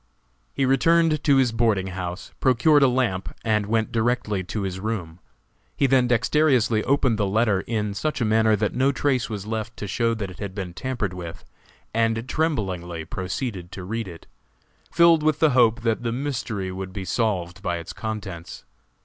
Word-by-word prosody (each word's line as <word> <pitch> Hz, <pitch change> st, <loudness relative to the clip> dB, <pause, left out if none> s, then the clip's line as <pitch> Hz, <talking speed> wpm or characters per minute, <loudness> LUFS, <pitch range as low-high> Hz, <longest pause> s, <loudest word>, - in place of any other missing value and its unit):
He 135 Hz, -, 0 dB
returned 155 Hz, +3 st, +3 dB
to 145 Hz, -3 st, +5 dB
his 130 Hz, -3 st, +3 dB
boarding 110 Hz, -5 st, +1 dB
house, 90 Hz, 0 st, -5 dB
procured 140 Hz, +4 st, +4 dB
a 135 Hz, -, +6 dB
lamp 120 Hz, -7 st, -1 dB
and 105 Hz, -2 st, +1 dB
went 110 Hz, 0 st, 0 dB
directly 110 Hz, -4 st, 0 dB
to 100 Hz, +2 st, -3 dB
his 95 Hz, -1 st, -3 dB
room. 95 Hz, -6 st, -4 dB, 0.6 s
He 140 Hz, -, +3 dB
then 130 Hz, -2 st, +4 dB
dexterously 125 Hz, -2 st, +2 dB
opened 130 Hz, -5 st, +2 dB
the 100 Hz, -, +2 dB
letter 105 Hz, -1 st, +2 dB
in 105 Hz, -3 st, -1 dB
such 150 Hz, +10 st, -2 dB
a 120 Hz, -, +1 dB
manner 110 Hz, 0 st, +3 dB
that 105 Hz, 0 st, -1 dB
no 130 Hz, +2 st, +2 dB
trace 135 Hz, -3 st, 0 dB
was 105 Hz, -3 st, -5 dB
left 110 Hz, +1 st, -4 dB
to -, -, -5 dB
show 115 Hz, +4 st, 0 dB
that 100 Hz, -4 st, -4 dB
it -, -, -13 dB
had 100 Hz, -2 st, -5 dB
been 95 Hz, -4 st, -5 dB
tampered 115 Hz, -3 st, -3 dB
with, 85 Hz, -2 st, -8 dB, 0.5 s
and 115 Hz, +1 st, +1 dB
tremblingly 95 Hz, -, -2 dB
proceeded 95 Hz, -, -4 dB
to 95 Hz, -, -7 dB
read 110 Hz, +3 st, -3 dB
it, 85 Hz, -2 st, -11 dB, 0.7 s
filled 170 Hz, -2 st, +5 dB
with 155 Hz, -1 st, +2 dB
the 155 Hz, -1 st, +4 dB
hope 120 Hz, -2 st, +4 dB
that 115 Hz, -1 st, 0 dB
the 120 Hz, -1 st, -2 dB
mystery 120 Hz, -7 st, -3 dB
would 95 Hz, 0 st, -6 dB
be 95 Hz, -1 st, -5 dB
solved 95 Hz, -5 st, -1 dB
by 90 Hz, -2 st, -1 dB
its 85 Hz, -, -7 dB
contents. 105 Hz, -6 st, -6 dB
110 Hz, 180 wpm, -24 LUFS, 95-125 Hz, 0.7 s, a